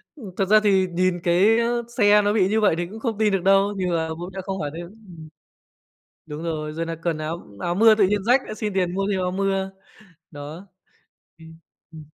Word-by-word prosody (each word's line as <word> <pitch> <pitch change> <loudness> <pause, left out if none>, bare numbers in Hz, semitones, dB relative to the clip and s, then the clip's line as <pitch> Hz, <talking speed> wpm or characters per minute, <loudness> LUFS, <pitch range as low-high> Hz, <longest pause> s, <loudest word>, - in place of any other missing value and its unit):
Ừm, 215 -10 -10
thật 195 - +1
ra 215 +2 +5
thì 190 -2 +3
nhìn 180 0 0
cái, 195 +7 +3
ơ, 235 0 0
xe 210 -1 +5
nó 205 0 +1
bị 190 -4 +3
như 220 +1 +1
vậy 205 -6 +3
thì 175 - -2
cũng 220 +4 -10
không 225 -3 -3
tin 215 -2 +1
được 190 -2 0
đâu, 195 +1 +3
nhưng 180 -1 -1
mà 160 -1 -1
bố 170 +3 -6
mẹ 190 - -5
không 195 -1 -4
hỏi 145 -1 -3
thêm, 170 0 -7
ừm. 180 -7 -14 1.0
Đúng 150 +2 -7
rồi, 155 -2 -4
rồi 165 +1 -3
nà 165 0 -4
cần 165 -2 -1
áo 155 +2 -6
áo 175 0 -2
mưa 220 +2 +6
tự 200 -3 +3
nhiên 205 -1 -1
rách, 250 +4 +3
lại 215 - -7
xin 210 -2 -4
tiền 180 -2 0
mua 195 0 -1
thêm 190 - -1
áo 180 0 -1
mưa. 195 0 -1 0.6
Đó, 150 +6 -9 0.7
ừm, 160 0 -14 0.3
ừm. 155 -2 -11
190 Hz, 230 wpm, -23 LUFS, 170-210 Hz, 1.0 s, mưa